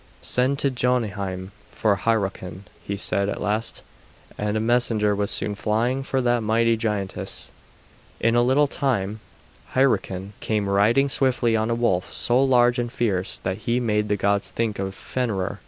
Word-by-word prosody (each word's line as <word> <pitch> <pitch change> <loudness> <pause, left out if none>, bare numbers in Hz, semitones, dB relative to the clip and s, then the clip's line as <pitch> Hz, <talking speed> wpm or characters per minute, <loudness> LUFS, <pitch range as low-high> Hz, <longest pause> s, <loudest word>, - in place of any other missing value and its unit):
"Send 130 +3 +2
to 140 -1 +1
Jotunheim 105 -7 -1 0.2
for 105 -2 +1
Hyrroken," 95 -3 -2 0.2
he 100 - -4
said 100 0 0
at - - -3
last; 105 +2 -2 0.5
and 105 +1 -1
a - - +1
messenger 110 -2 +2
was 100 0 -1
soon 105 - -1
flying 115 +6 0
for 135 0 -1
that 120 -1 +2
mighty 115 +1 +2
giantess. 105 -4 -3 0.7
In 115 +1 +2
a 120 - +5
little 130 +4 +4
time, 110 -8 -1 0.6
Hyrroken 100 -7 +1
came 105 -2 -1
riding 105 +8 +3
swiftly 130 -4 +1
on 110 +1 0
a 115 - +1
wolf 105 -7 0
so 125 +3 +2
large 125 -2 +4
and 120 -1 -2
fierce 100 -7 -1
that 95 0 -2
he 120 +1 +2
made 105 -3 0
the 105 - +1
gods 100 +1 0
think 110 -3 -2
of 95 0 -3
Fenrer. 100 -6 -3
110 Hz, 160 wpm, -23 LUFS, 100-120 Hz, 0.7 s, a